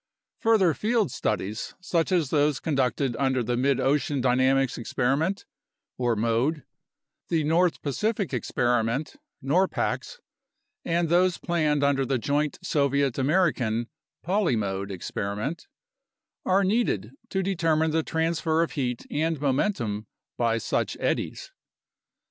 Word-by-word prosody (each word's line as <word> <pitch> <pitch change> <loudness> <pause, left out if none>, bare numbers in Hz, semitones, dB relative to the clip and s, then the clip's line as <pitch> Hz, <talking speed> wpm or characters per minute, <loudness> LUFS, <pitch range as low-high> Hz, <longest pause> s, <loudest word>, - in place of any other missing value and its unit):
Further 210 -7 +4
field 220 +2 0
studies 105 +1 -3
such 175 -2 0
as 170 -7 +1
those 145 -2 +2
conducted 135 -4 0
under 130 -2 +1
the 120 +2 -1
Mid 135 +2 +2
ocean 145 0 +1
Dynamics 130 +1 +2
Experiment 140 - 0 0.5
(mode), 120 +5 +1 0.7
the 160 -2 +1
North 165 +3 +2
Pacific 200 - -1
Experiment 120 +3 0 0.3
(norpax), 185 - 0 0.7
and 170 0 +1
those 175 +2 +3
planned 155 -4 0
under 140 -1 +2
the 135 0 0
joint 145 +5 0
Soviet 140 -2 +1
American 130 -7 +1 0.4
(polymode) 110 - 0
experiment, 100 - -4 0.8
are 190 +2 +4
needed 190 - 0 0.2
to 190 0 -1
determine 165 -4 +1
the 160 +1 +2
transfer 160 0 0
of 170 - -3
heat 125 -4 -3
and 160 0 0
momentum 130 - -1 0.3
by 115 -1 +1
such 115 - -1
eddies. - - -2
145 Hz, 115 wpm, -26 LUFS, 125-170 Hz, 0.8 s, Further